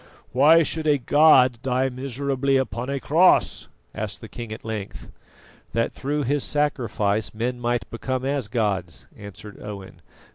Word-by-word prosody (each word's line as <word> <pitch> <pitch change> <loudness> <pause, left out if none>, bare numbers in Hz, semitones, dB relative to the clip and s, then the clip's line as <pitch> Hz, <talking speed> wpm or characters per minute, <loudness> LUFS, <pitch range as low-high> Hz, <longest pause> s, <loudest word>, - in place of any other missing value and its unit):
"Why 155 +6 +6
should 160 0 -2
a 145 -1 +4
God 130 -3 +5
die 130 0 0
miserably 135 +1 -1
upon 125 -1 -3
a 140 0 -2
cross?" 165 +7 +3 0.3
asked - - -5
the - - -10
king 115 -2 -8
at 110 - -8
length. 110 -3 -6 0.6
"That 115 +2 0
through 145 +2 -2
His 140 +1 0
sacrifice 115 -8 -1
men 120 +3 -2
might 120 -3 -1
become 130 +2 -3
as 135 -4 -1
gods," 100 -7 -2
answered 105 +1 -11
Owen. 100 -2 -9
125 Hz, 145 wpm, -23 LUFS, 110-140 Hz, 0.6 s, Why